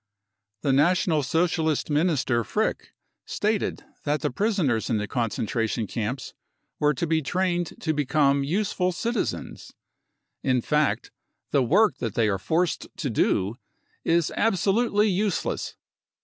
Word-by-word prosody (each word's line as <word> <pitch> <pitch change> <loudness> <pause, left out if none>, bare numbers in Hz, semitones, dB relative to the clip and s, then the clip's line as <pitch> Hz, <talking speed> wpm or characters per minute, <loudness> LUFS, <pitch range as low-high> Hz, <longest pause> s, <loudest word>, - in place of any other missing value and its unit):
The 140 - +1
National 160 +2 +3
Socialist 160 +1 +1
minister 145 -6 +2
Frick 220 - -2 0.3
stated 210 0 -1 0.2
that 145 -1 0
the - - -1
prisoners 165 - 0
in 115 - +2
the 105 0 -2
concentration 115 -1 -1
camps 115 +6 -4 0.5
were 150 -1 +3
to 170 - -1
be 160 -1 +1
trained 175 +2 -1
to 160 - 0
become 140 -1 +2
useful 180 +3 0
citizens. 235 +7 -3 0.7
In 130 -2 +2
fact, 150 +4 0 0.4
the 140 - +3
work 175 - +3
that 115 -4 -3
they 110 -2 +3
are 95 -2 0
forced 165 - 0
to 140 -6 -2
do 105 0 +1 0.5
is 170 -1 +2
absolutely 210 +1 +2
useless. 200 -1 -1
155 Hz, 125 wpm, -25 LUFS, 125-180 Hz, 0.7 s, National